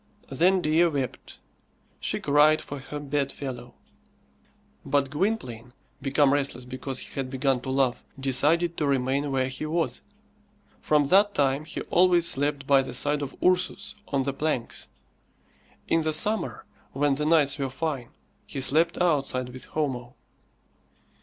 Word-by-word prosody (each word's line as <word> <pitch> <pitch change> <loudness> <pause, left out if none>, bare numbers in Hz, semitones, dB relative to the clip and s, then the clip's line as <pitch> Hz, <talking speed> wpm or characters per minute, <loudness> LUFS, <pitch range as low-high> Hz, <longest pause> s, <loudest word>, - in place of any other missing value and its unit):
Then 180 +7 +3
Dea 160 +2 +3
wept. 140 -5 -4 0.6
She - - -2
cried 150 +2 +4
for 145 - -7
her 145 +2 -7
bed 140 -1 -1
fellow; 125 -3 -7 1.1
but 140 -1 0
Gwynplaine, 130 - -2 0.3
become 140 0 +3
restless 135 -3 -1
because 130 +1 -4
he - - -7
had 135 -2 -3
begun 135 -1 0
to 130 - -6
love, 130 -2 +1 0.2
decided 150 +6 +2
to 150 - 0
remain 135 +1 0
where 130 -1 +1
he 130 +4 -5
was. 165 +1 -1 0.8
From 150 -1 +3
that 200 +6 +4
time 140 +1 +1
he - - -6
always 175 -1 +3
slept 145 -1 0
by 135 -1 +5
the 130 -2 -4
side 145 +3 +2
of 140 -1 -5
Ursus 185 +3 +1
on 140 -2 0
the 140 0 -2
planks. 145 -4 -3 1.0
In 165 - +2
the 155 0 -1
summer, 155 - 0 0.3
when 145 +1 +2
the 150 +2 -2
nights 145 -3 +3
were 135 -1 -1
fine, 135 -2 -3 0.4
he 140 - -5
slept 155 +5 +1
outside 140 -7 +1
with 125 +1 -10
Homo. 130 -5 -3
140 Hz, 145 wpm, -26 LUFS, 130-155 Hz, 1.1 s, by